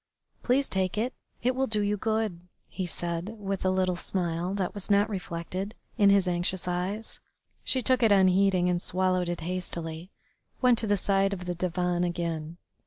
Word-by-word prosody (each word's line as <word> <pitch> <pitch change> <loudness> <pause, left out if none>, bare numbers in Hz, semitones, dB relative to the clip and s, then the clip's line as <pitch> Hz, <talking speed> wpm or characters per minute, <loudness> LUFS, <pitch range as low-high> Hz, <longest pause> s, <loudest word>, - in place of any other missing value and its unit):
"Please 265 +3 +2
take 190 0 -1
it. 240 +5 0 0.3
It 255 +2 +2
will 265 +1 0
do 215 -3 +1
you 205 0 +1
good," 215 -4 -1 0.3
he 185 -2 -4
said, 175 +5 -2
with 195 -2 -3
a 185 - +2
little 185 -1 +1
smile 175 0 -1
that 190 -3 -2
was 205 -1 -2
not 205 +1 +4
reflected 185 +2 -4 0.2
in 205 -4 +5
his 200 -2 +4
anxious 175 +1 -1
eyes. 185 +5 -3 0.4
She 260 -2 +1
took 255 0 +3
it 225 -3 +4
unheeding, 190 -1 +4
and, 175 -1 +1
swallowing 185 -1 +1
it 175 -1 -3
hastily, 170 -1 -3 0.5
went 250 -2 +4
to 225 - +1
the 205 0 +3
side 195 0 +2
of 180 -2 -6
the 180 - -2
divan 180 0 -1
again. 170 -2 -3
185 Hz, 175 wpm, -28 LUFS, 175-205 Hz, 0.5 s, in